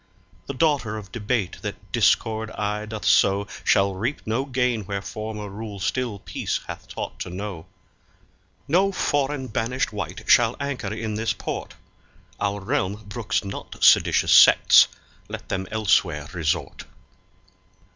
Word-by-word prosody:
The 140 Hz, -, -5 dB
daughter 130 Hz, -8 st, +1 dB
of 100 Hz, -3 st, -10 dB
debate 110 Hz, -4 st, -2 dB
that -, -, -7 dB
discord 110 Hz, 0 st, +2 dB
aye 105 Hz, +1 st, -2 dB
doth 110 Hz, -1 st, -6 dB
sow 100 Hz, +1 st, +4 dB, 0.2 s
Shall 100 Hz, 0 st, +3 dB
reap 115 Hz, +10 st, -3 dB
no 115 Hz, +5 st, -1 dB
gain 125 Hz, -4 st, 0 dB
where 100 Hz, 0 st, -2 dB
former 105 Hz, +1 st, -6 dB
rule 100 Hz, 0 st, -7 dB
still 120 Hz, +2 st, -2 dB
peace -, -, -3 dB
hath -, -, -8 dB
taught -, -, -6 dB
to -, -, -5 dB
know. 95 Hz, -2 st, -6 dB, 1.0 s
No 190 Hz, +6 st, +3 dB
foreign 145 Hz, -6 st, -1 dB
banished 125 Hz, +1 st, -2 dB
wight 100 Hz, +1 st, -5 dB
shall 120 Hz, 0 st, +5 dB
anchor 135 Hz, -8 st, -3 dB
in 110 Hz, 0 st, -4 dB
this 110 Hz, +1 st, -1 dB
port; -, -, -6 dB, 0.6 s
Our 100 Hz, 0 st, -1 dB
realm 100 Hz, +2 st, -2 dB
brooks 110 Hz, +2 st, -2 dB
not 100 Hz, -, -7 dB
seditious -, -, +5 dB
sects, -, -, +8 dB, 0.4 s
let -, -, -8 dB
them 95 Hz, -1 st, -2 dB
elsewhere 95 Hz, -8 st, +1 dB
resort. 80 Hz, -3 st, -2 dB
110 Hz, 135 wpm, -24 LUFS, 100-125 Hz, 1.0 s, sects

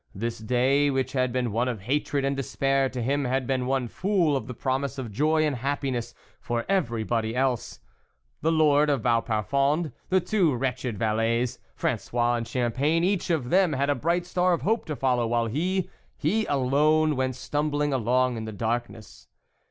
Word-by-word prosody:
This 115 Hz, +4 st, -3 dB
day 130 Hz, +5 st, +2 dB
which 130 Hz, -1 st, -1 dB
had 130 Hz, -2 st, +1 dB
been 125 Hz, -2 st, -1 dB
one 115 Hz, +4 st, 0 dB
of 120 Hz, -5 st, -3 dB
hatred 140 Hz, +4 st, -1 dB
and 140 Hz, 0 st, 0 dB
despair 135 Hz, 0 st, 0 dB
to 125 Hz, -2 st, -4 dB
him, 140 Hz, +3 st, 0 dB
had 130 Hz, +1 st, 0 dB
been 130 Hz, -1 st, -1 dB
one 130 Hz, -2 st, 0 dB
full 180 Hz, -, +1 dB
of 135 Hz, -, -3 dB
the 125 Hz, -, -6 dB
promise 135 Hz, +3 st, -2 dB
of 125 Hz, -5 st, -5 dB
joy 155 Hz, +8 st, +2 dB
and 150 Hz, -3 st, 0 dB
happi 140 Hz, +2 st, -2 dB
ness 120 Hz, -2 st, -4 dB, 0.2 s
for 120 Hz, 0 st, -3 dB
everybody 115 Hz, -, 0 dB
else; 130 Hz, -3 st, -1 dB, 0.6 s
the 160 Hz, -, +2 dB
lord 150 Hz, -2 st, +4 dB
of 140 Hz, -5 st, +1 dB
Vau 115 Hz, 0 st, +2 dB
parfond, 140 Hz, -, 0 dB, 0.2 s
the 190 Hz, -, +4 dB
two 180 Hz, -, +1 dB
wretched 125 Hz, -2 st, -2 dB
valets, 115 Hz, +3 st, 0 dB, 0.2 s
Fran -, -, 0 dB
9ois 120 Hz, 0 st, 0 dB
and 115 Hz, -, -5 dB
Champagne, 130 Hz, +7 st, 0 dB
each 190 Hz, 0 st, 0 dB
of 145 Hz, -8 st, -1 dB
them 185 Hz, -3 st, +4 dB
had 140 Hz, +1 st, +1 dB
a -, -, +4 dB
bright 170 Hz, +4 st, 0 dB
star 180 Hz, 0 st, +1 dB
of 170 Hz, -, -2 dB
hope 225 Hz, +3 st, +1 dB
to 155 Hz, -, -4 dB
follow; 125 Hz, -3 st, +1 dB
while 120 Hz, 0 st, +1 dB
he, 175 Hz, -, -1 dB, 0.3 s
he 220 Hz, +1 st, 0 dB
alone, 150 Hz, +3 st, +2 dB
went 130 Hz, -1 st, -1 dB
stumbling 145 Hz, +2 st, -1 dB
along 125 Hz, 0 st, +1 dB
in 110 Hz, -, -5 dB
the 110 Hz, -, -5 dB
darkness. 115 Hz, 0 st, -4 dB
135 Hz, 185 wpm, -26 LUFS, 120-150 Hz, 0.6 s, lord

